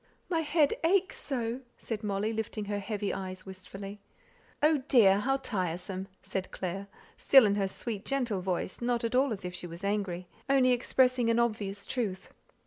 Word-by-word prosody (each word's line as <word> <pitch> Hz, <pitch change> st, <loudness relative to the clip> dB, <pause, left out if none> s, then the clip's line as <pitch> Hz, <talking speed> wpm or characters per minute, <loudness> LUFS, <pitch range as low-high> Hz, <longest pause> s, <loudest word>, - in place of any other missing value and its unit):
"My 335 Hz, -3 st, +1 dB
head 305 Hz, -2 st, +3 dB
aches 370 Hz, +3 st, +2 dB
so," 245 Hz, -2 st, -2 dB, 0.2 s
said 220 Hz, -2 st, -4 dB
Molly, 210 Hz, +2 st, -1 dB
lifting 215 Hz, -1 st, -3 dB
her 205 Hz, 0 st, -2 dB
heavy 205 Hz, 0 st, -2 dB
eyes 185 Hz, -1 st, -5 dB
wistfully. 195 Hz, +2 st, -8 dB, 0.6 s
"Oh, 310 Hz, 0 st, +5 dB
dear, 205 Hz, -8 st, +6 dB
how 270 Hz, +5 st, +1 dB
tiresome!" 185 Hz, -5 st, -3 dB, 0.2 s
said 190 Hz, -1 st, -3 dB
Clare, 190 Hz, +2 st, -4 dB, 0.3 s
still 270 Hz, -4 st, +7 dB
in 200 Hz, -, +3 dB
her 200 Hz, -1 st, +1 dB
sweet 210 Hz, +1 st, -4 dB
gentle 245 Hz, -8 st, -1 dB
voice, 185 Hz, +2 st, -2 dB
not 240 Hz, -1 st, 0 dB
at 230 Hz, -, -1 dB
all 260 Hz, +1 st, +3 dB
as 195 Hz, -4 st, -4 dB
if 180 Hz, -, -4 dB
she 180 Hz, 0 st, -6 dB
was 170 Hz, +2 st, -8 dB
angry, 195 Hz, -3 st, -1 dB, 0.2 s
only 265 Hz, -2 st, +5 dB
expressing 250 Hz, -1 st, +3 dB
an 230 Hz, -, +3 dB
obvious 210 Hz, -4 st, 0 dB
truth. 205 Hz, -7 st, -3 dB
210 Hz, 170 wpm, -30 LUFS, 195-250 Hz, 0.6 s, still